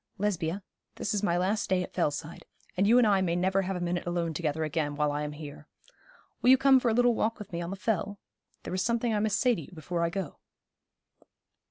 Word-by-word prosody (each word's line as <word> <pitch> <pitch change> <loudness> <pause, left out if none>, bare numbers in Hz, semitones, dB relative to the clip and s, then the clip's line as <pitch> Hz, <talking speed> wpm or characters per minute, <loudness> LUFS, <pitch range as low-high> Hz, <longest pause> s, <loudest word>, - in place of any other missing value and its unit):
'Lesbia, 190 -2 -1 0.3
this - - -2
is 205 - 0
my 175 -5 +1
last 200 +5 0
day 185 -1 +2
at - - -9
Fellside, 150 +3 -2 0.3
and 195 +2 +2
you 235 +3 +6
and 250 - +6
I 200 -3 +3
may 170 -2 0
never 190 +2 +2
have 190 0 -3
a - - -3
minute 175 0 -2
alone 170 -2 -1
together 155 -1 -1
again 150 -1 -2
while 150 0 +1
I 145 +1 -2
am 150 0 -4
here. 150 0 -10 0.7
Will 250 - +4
you 260 - +8
come 265 0 +5
for 245 - +1
a - - +2
little 245 0 +4
walk 225 0 0
with 210 -1 -10
me 170 - -2
on 170 - -4
the 195 - -4
Fell? 200 0 -2 0.4
There - - -5
is 185 - 0
something 235 +2 0
I 210 - +1
must 210 -1 +1
say 250 -1 +4
to 200 - -4
you 140 - -12
before 170 +1 -4
I 170 - +1
go.' 180 -4 -5
185 Hz, 240 wpm, -29 LUFS, 165-210 Hz, 0.7 s, you